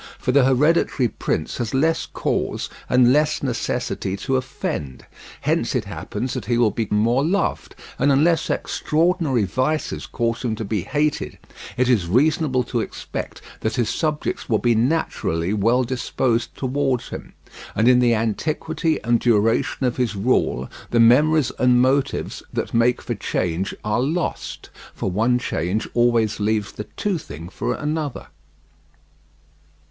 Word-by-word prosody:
For 125 - -1
the 135 0 +5
hereditary 135 -1 +3
prince 80 - -3
has 120 0 -2
less 160 +4 +1
cause - - -2 0.2
and 125 0 +5
less 150 0 +2
necessity 115 -6 -2
to 135 +7 -1
offend; 75 - -4 0.4
hence - - 0
it - - 0
happens 125 0 -4
that - - -4
he 120 - +1
will 115 -3 +3
be 110 +1 -2
more 115 +6 +2
loved; 190 +6 -1 0.2
and 140 - +4
unless 160 +5 +3
extraordinary 160 - +1
vices 130 - -1
cause 115 -1 -1
him 115 -3 -1
to 110 - -5
be 105 -1 -1
hated, 150 - -1 0.4
it 125 0 +2
is 110 -9 +2
reasonable 130 - +2
to 120 0 -2
expect - - -6 0.2
that 110 - -2
his 120 -4 0
subjects 150 -3 -2
will 110 - +3
be 120 +2 +2
naturally 110 - 0
well 115 +5 +2
disposed 120 -1 -1
towards 130 -2 -1
him; - - -8 0.4
and 110 +3 +2
in 125 0 +6
the 120 -2 +4
antiquity 155 - -1
and 120 +1 +2
duration 115 +3 +2
of 125 - 0
his 125 -4 0
rule 95 - +1 0.2
the 120 - +2
memories 145 +5 +5
and 125 0 +4
motives 135 +2 +1
that - - -3
make 120 +2 +2
for 120 - -2
change 95 -2 -2
are 105 +3 0
lost, 160 +6 -3 0.2
for 95 - -2
one 115 +6 +2
change 105 -3 -2
always 120 -3 +2
leaves 105 0 0
the 105 - -7
toothing 150 - -3
for - - -2
another. 150 -2 -3
125 Hz, 145 wpm, -22 LUFS, 110-140 Hz, 0.4 s, in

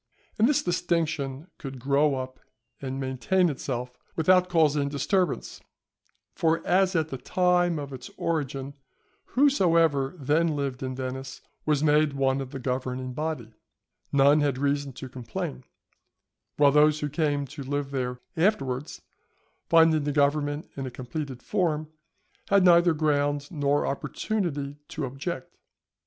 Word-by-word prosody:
And 225 +4 +5
this 295 - +2
distinction 165 -5 -1
could 135 -2 -7
grow 140 +3 +2
up 130 0 -6 0.4
and 135 0 -4
maintain 135 +8 +1
itself 125 -3 -4 0.2
without 180 +2 +4
causing 150 -4 +3
disturbance; 175 +4 -1 0.7
for 165 0 +1
as 190 0 +3
at 160 -2 +1
the 135 - -5
time 180 0 +2
of 140 -2 -6
its 125 -1 -8
origin, 140 -4 -2 0.6
whosoever 165 - +3
then 155 +2 +1
lived 140 -3 -3
in 130 -1 -3
Venice 130 +1 -5 0.3
was 150 -1 +2
made 150 -1 +3
one 135 0 +1
of 135 - -6
the 135 - -6
governing 130 0 -3
body, 150 -6 -4 0.6
none 140 +2 +5
had 140 -3 +1
reason 140 0 0
to 130 - -8
complain; 115 - -6 0.9
while 145 -1 +6
those 150 +1 +4
who 150 - 0
came 145 -1 0
to 140 +2 -9
live 140 +1 -3
there 125 -2 -3
afterwards, 150 -7 0 0.7
finding 160 -2 +5
the 145 - -1
government 145 +1 +1
in 135 -1 -4
a - - -3
completed 130 +1 -6
form, 155 -6 -1 0.6
had 200 -2 +5
neither 170 -1 +6
ground 145 -1 0
nor 145 -3 +1
opportunity 145 -2 -2
to 155 - -4
object. 135 +2 -5
145 Hz, 135 wpm, -27 LUFS, 135-160 Hz, 0.9 s, while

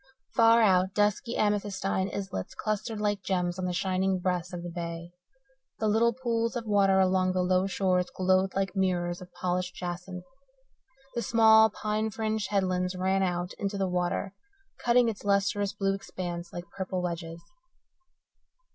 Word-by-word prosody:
Far 230 -1 +6
out 185 -2 +3
dusky 210 +3 +1
amethystine 200 -2 0
islets 190 - -5
clustered 215 +1 -3
like 205 -2 0
gems 180 -2 -1
on 185 - -2
the 180 - -1
shining 185 +1 0
breast 180 -1 -2
of 175 -1 -6
the 175 - -6
bay. 170 0 -6 0.7
The 220 - 0
little 225 +3 +3
pools 230 -1 -1
of 235 -1 -3
water 200 -2 +3
along 185 0 +2
the 185 0 +1
low 185 +1 +2
shores 185 -2 +1
glowed 185 +1 +1
like 195 -1 -1
mirrors 175 -2 0
of 180 0 -11
polished 180 0 -2
jacinth. 180 0 -6 0.9
The 235 - -2
small, 220 -1 +6
pine 215 +1 -2
fringed 220 -1 -2
headlands 185 -2 0
ran 190 +1 +1
out 180 -1 -1
into 200 0 -2
the 195 -1 0
water, 180 +2 -1 0.5
cutting 240 0 +4
its 220 -3 -3
lustrous 200 0 +1
blue 195 -1 0
expanse 175 -3 -6
like 175 0 -7
purple 185 -1 -3
wedges. 170 -1 -5
190 Hz, 155 wpm, -28 LUFS, 180-210 Hz, 0.9 s, Far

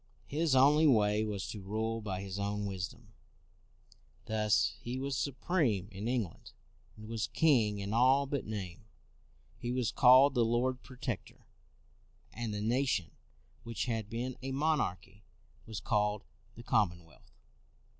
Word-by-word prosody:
His 155 -1 0
only 150 +4 +6
way 105 -4 +3
was 105 -3 -3
to 105 - -6
rule 110 +3 -2
by 95 -3 -4
his 100 0 -5
own 100 +1 -2
wisdom. 100 +3 -6 1.1
Thus 110 -1 +2
he 120 +2 -4
was 135 +1 -2
supreme 130 - 0
in 100 +3 -5
England, 120 -8 -3 0.4
and 110 0 -10
was 115 -2 -2
king 120 -10 +3
in 100 +1 -4
all 130 +4 +4
but 140 -1 -2
name. 95 -6 -6 0.7
He 120 - -3
was 125 -2 0
called 130 +2 +7
the 120 -3 +3
Lord 125 +3 0
Protector, 130 -2 -6 0.9
and 115 -1 -4
the 105 0 -3
nation 120 -5 0 0.5
which 115 -3 -4
had 110 -4 -3
been 120 +2 -4
a 135 +1 -4
monarchy 145 - -1 0.5
was 110 -3 -5
called 105 0 0 0.3
the 120 - -11
Com 105 -5 +3
monwealth. 85 -4 -17
115 Hz, 140 wpm, -32 LUFS, 105-130 Hz, 1.1 s, called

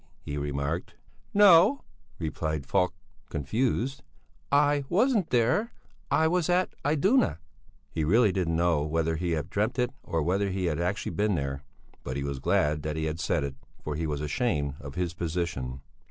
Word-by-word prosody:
he 75 - -5
remarked. 70 +3 -3 0.4
"No," 200 +5 +6 0.3
replied 80 -3 -3
Falk, 90 +4 +1 0.3
confused; 120 - -1 0.5
"I 145 0 +3
wasn't 215 -1 +2
there, 125 - +2 0.4
I 160 - +3
was 180 0 +1
at 180 +1 +2
Iduna." 170 - +3 0.5
He 80 - -1
really 105 +6 +4
did 95 -2 -1
not 80 - 0
know 85 -2 +2
whether 80 +2 0
he 85 +1 -1
had 75 -2 -3
dreamt 110 +5 0
it 125 -1 +1
or 80 -2 -1
whether 100 +5 +1
he 95 -1 -2
had 80 -2 0
actually 90 +3 -1
been 105 -1 +1
there; 70 -3 -3 0.4
but 65 +2 -4
he 70 - -2
was 70 -1 -3
glad 75 +3 +1
that 75 0 -3
he 80 - -2
had 80 +1 -3
said 85 -3 0
it, 70 -1 -3 0.3
for 75 - -3
he 80 +1 -2
was 75 -1 -2
ashamed 75 - 0
of 70 -1 -9
his 90 -2 -1
position. 80 -7 -3
85 Hz, 170 wpm, -28 LUFS, 75-125 Hz, 0.5 s, No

